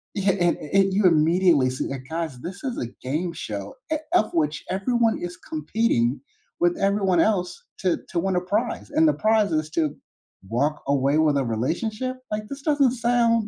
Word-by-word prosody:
e 200 - -1
he 195 - +2
a - - -1
a 175 0 +1
and 195 -1 +1
you 200 0 +2
immediately 165 -4 +4
see 130 - -3
that, 135 -2 -5
"Guys, 160 -6 -4
this 185 - -8
is 255 -3 -3
a - - -2 0.2
game 160 +7 -2
show, 100 -10 -6 0.2
eh, 310 - +2 0.2
of 215 - +3
which 150 -3 0
everyone 225 +4 +1
is 175 0 -6
competing 150 - 0 0.4
with 175 0 +2
everyone 195 -3 +2
else 180 -3 +1 0.2
to 185 -2 +1
to 170 - -1
win 190 +1 0
a 180 - +2
prize, 215 +10 -2
and 315 +2 +4
the 300 - +4
prize 215 -3 +2
is 155 0 0
to 155 -3 0 0.5
walk 145 +6 0
away 140 +1 +2
with 155 -2 +3
a 135 - +1
relationship?" 215 - -2
Like, 210 0 -3
this 280 0 -7
doesn't 285 -5 +3
sound 235 -2 +2
180 Hz, 190 wpm, -24 LUFS, 150-215 Hz, 0.5 s, immediately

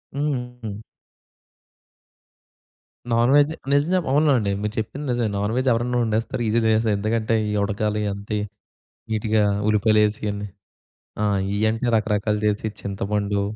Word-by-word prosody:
హుహు. 125 -7 -3 2.4
నాన్‌వెజ్ 140 +6 +4 0.2
నిజం 145 +4 +3
చెప్పు 175 -7 0
అవును 150 +2 +4
అండి. 100 -3 0
మీరు 105 0 -2
చెప్పింది 140 +7 -5
నిజమే. 120 -3 0
నాన్‌వెజ్ 115 +6 -1
ఎవరన్నా 120 +1 0
వండేస్తారు. 110 +2 -1
ఈజీగా 115 +2 +2
తినేస్తారు. 110 -1 +2
ఎందుకంటే, 110 +1 0 0.2
ఈ - - -1
ఉడకాలి 105 +1 -1
అంత 100 +2 -10 0.8
నీట్‌గా, 110 0 +1 0.3
ఉల్లిపాయలు 105 0 +3
వేసి, 105 0 -1
ఇవన్నీ 105 0 -3 0.7
ఆ! - - +1 0.3
ఇవి 100 - -1
అంటే 115 +2 -2
రకరకాలు 105 -1 0
చేసి, 105 +1 0
చింతపండు 100 0 -1
110 Hz, 125 wpm, -23 LUFS, 105-125 Hz, 2.4 s, నాన్‌వెజ్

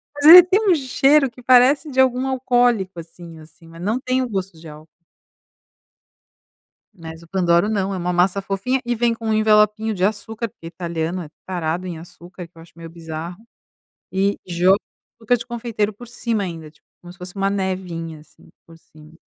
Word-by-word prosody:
Mas 290 0 -3
ele 350 +3 +12
tem 375 +4 +1
um 360 - +5
cheiro 275 0 +2
que 250 - -16
parece 255 +5 +4
de 265 -1 -3
algum 260 0 +2
alcoólico 245 -8 0
assim 165 0 -12
assim, 160 +2 -18
mas 165 +1 -13
não 215 +7 -1
tem 255 0 -1
o 255 - -3
gosto 190 -5 -5
de 165 - -13
álcool. 155 +1 -12 2.1
Mas 165 -2 -11
o - - -17
Pandoro 175 +2 +1
não. 200 -2 -1
É 190 - -4
uma 180 0 -2
massa 180 +3 +1
fofinha 200 +7 -2
e 240 - -1
vem 235 0 +1
com 225 0 -7
um - - +1
envelopinho 215 0 +2
de 185 -2 -3
açúcar, 220 +3 -2
porque 165 - -13
italiano 170 +1 -4
é 150 - -12 0.2
tarado 180 0 -3
em 170 -2 -6
açúcar, 175 +2 -12
o 170 - -11
que 170 - -28
eu 165 - -13
acho 165 - -18
meio 165 0 -10
bizarro. 165 +1 -8 0.8
E 195 +1 0
joga 180 +2 +3 0.5
o 225 - -17
açúcar 245 +3 +3
de 235 - -9
confeiteiro 230 -3 -3
por 240 +4 -13
cima 230 -2 -3
ainda, 165 -4 -8
tipo, 150 - -31
como 175 0 -12
se 185 - -21
fosse 180 0 -9
uma 195 0 -1
nevinha 180 -5 -4
assim 150 0 -22 0.2
por 165 - -16
cima. 155 0 -19
190 Hz, 200 wpm, -20 LUFS, 170-235 Hz, 2.1 s, ele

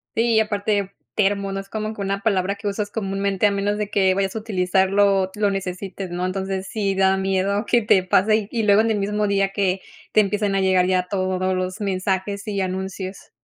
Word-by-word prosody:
Sí, 230 -1 +3
aparte 205 -2 0 0.2
termo, 200 -1 +1
no 195 - -3
es 195 - -9
como 215 0 -3
que 200 - -7
una 195 0 -2
palabra 200 -2 +1
que 205 0 -6
usas 205 +1 -2
comúnmente 195 -1 0
a - - +1
menos 200 +1 -1
de 210 -1 -3
que 190 -2 +3
vayas 195 +1 -1
a - - -1
utilizarlo, 195 -1 +2
o 190 - -5
lo 205 -1 +1
necesites, 190 0 -5
¿no? 180 +1 -2
Entonces 190 0 -3
sí 200 -3 -1
da 190 0 +3
miedo 195 +2 0
que 240 -1 +3
te 190 -3 +3
pase 210 +3 +2
y 230 -2 -1
luego, 205 +1 +5
en 225 0 +1
el 210 - 0
mismo 210 +1 0
día 195 -1 +1
que 195 -1 0 0.3
te 215 - +5
empiezan 205 0 0
a 195 - +2
llegar 185 -1 +3
ya 180 -1 +1
todos 185 -1 0
los 185 +3 -3
mensajes 195 +2 -2
y 200 -2 -1
anuncios. 190 +1 -5
195 Hz, 210 wpm, -22 LUFS, 190-205 Hz, 0.3 s, luego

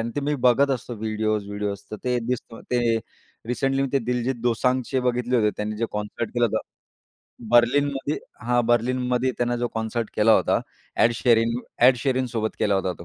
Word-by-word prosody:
अन् 115 +1 -2
ते 145 - +1
मी 145 +1 0
बघत 140 +3 +3
असतो 125 -1 -3
व्हिडिओज-व्हिडिओज 105 -2 -2
तर 110 - -4
ते 125 -1 +1
दिसतं. 120 -2 -4
ते 120 -2 +2 0.5
रिसेंटली 135 +2 0
मी 135 - 0
ते 140 - +3
दिलजीत 125 +1 -1
दोसांगचे 125 +2 +1
बघितले 125 0 0
होते. 105 -3 +3
त्यांनी 105 0 -3
जे 115 - -1
कॉन्सर्ट 105 +2 -4
केलं 120 -1 +3
होतं, - - -1 0.9
बर्लिनमध्ये 140 +4 +3 0.3
हां, 120 -1 +2
बर्लिनमध्ये 125 +2 +1
त्यानं 120 0 0
जो 120 0 -1
कॉन्सर्ट 115 0 -2
केला 110 +1 +5
होता - - +3 0.4
एड 120 - +4
शेरिंग 115 -1 +2 0.3
एड 125 0 +7
शेरिंगसोबत 125 -4 -1
केला 105 -2 +2
होता 95 -1 0
तो. 85 - -10
120 Hz, 170 wpm, -24 LUFS, 110-125 Hz, 0.9 s, एड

